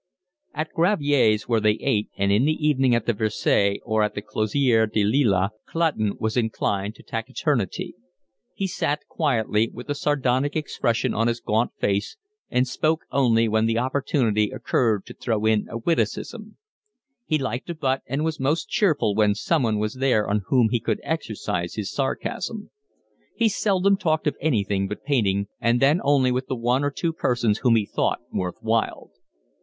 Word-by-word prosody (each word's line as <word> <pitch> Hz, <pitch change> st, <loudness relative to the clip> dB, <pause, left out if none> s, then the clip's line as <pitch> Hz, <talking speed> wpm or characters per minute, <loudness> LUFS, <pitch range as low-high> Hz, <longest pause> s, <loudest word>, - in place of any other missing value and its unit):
At 155 Hz, +2 st, -3 dB
Gravier's 145 Hz, -, +2 dB
where 115 Hz, -2 st, +2 dB
they 105 Hz, 0 st, +3 dB
ate, 105 Hz, 0 st, 0 dB
and 100 Hz, 0 st, +1 dB
in 105 Hz, +6 st, +3 dB
the 155 Hz, 0 st, +1 dB
evening 135 Hz, -4 st, +3 dB
at 115 Hz, -, -1 dB
the 120 Hz, -, +1 dB
Versailles 105 Hz, -2 st, +1 dB
or 110 Hz, -1 st, 0 dB
at 105 Hz, -, 0 dB
the 105 Hz, -, -4 dB
Closerie 110 Hz, +1 st, +1 dB
des 110 Hz, -2 st, +1 dB
Lilas 105 Hz, -4 st, +2 dB, 0.2 s
Clutton 155 Hz, -12 st, 0 dB
was 110 Hz, 0 st, -1 dB
inclined 110 Hz, -3 st, -1 dB
to -, -, -16 dB
taciturnity. 120 Hz, -, -2 dB, 0.6 s
He 195 Hz, -, -2 dB
sat 150 Hz, -5 st, -2 dB
quietly, 115 Hz, -7 st, 0 dB
with -, -, -7 dB
a -, -, +2 dB
sardonic 140 Hz, -1 st, 0 dB
expression 120 Hz, -6 st, -1 dB
on 115 Hz, +1 st, +1 dB
his 120 Hz, 0 st, -1 dB
gaunt 110 Hz, +2 st, 0 dB
face, 100 Hz, -, -1 dB, 0.3 s
and 125 Hz, +1 st, +1 dB
spoke 155 Hz, +5 st, 0 dB
only 115 Hz, -4 st, +3 dB
when 110 Hz, +1 st, +2 dB
the 115 Hz, 0 st, 0 dB
opportunity 125 Hz, -4 st, +1 dB
occurred 110 Hz, -6 st, 0 dB
to -, -, -10 dB
throw 110 Hz, -3 st, -2 dB
in 110 Hz, -1 st, +2 dB
a 115 Hz, -, -4 dB
witticism. 170 Hz, -, -2 dB, 0.7 s
He 155 Hz, -, +2 dB
liked 130 Hz, -1 st, -4 dB
a 170 Hz, -, -3 dB
butt 135 Hz, -4 st, 0 dB
and 140 Hz, +5 st, -1 dB
was 160 Hz, -1 st, -2 dB
most 145 Hz, +5 st, 0 dB
cheerful 155 Hz, -, +2 dB
when 105 Hz, -1 st, +3 dB
someone 115 Hz, -, +1 dB
was 105 Hz, +1 st, -1 dB
there 130 Hz, -5 st, +1 dB
on 105 Hz, +1 st, 0 dB
whom 125 Hz, -4 st, +3 dB
he 120 Hz, -, +1 dB
could 110 Hz, 0 st, -2 dB
exercise 110 Hz, -, -3 dB
his 105 Hz, -3 st, -4 dB
sarcasm. 205 Hz, +9 st, -3 dB, 0.6 s
He 230 Hz, -, +3 dB
seldom 195 Hz, -1 st, +2 dB
talked 160 Hz, -5 st, 0 dB
of 150 Hz, -, 0 dB
anything 100 Hz, -9 st, 0 dB
but 105 Hz, -, -7 dB
painting, 100 Hz, -9 st, +1 dB
and 115 Hz, +1 st, +2 dB
then 145 Hz, +6 st, +3 dB
only 140 Hz, -2 st, +3 dB
with 130 Hz, +1 st, -2 dB
the 130 Hz, -, -2 dB
one 120 Hz, +4 st, +1 dB
or 145 Hz, -, +1 dB
two 165 Hz, +4 st, -2 dB
persons 120 Hz, -7 st, 0 dB
whom 120 Hz, -3 st, +3 dB
he 110 Hz, -2 st, +2 dB
thought -, -, 0 dB
worth 90 Hz, -1 st, -3 dB
while. 115 Hz, 0 st, -1 dB
120 Hz, 175 wpm, -24 LUFS, 110-145 Hz, 0.7 s, they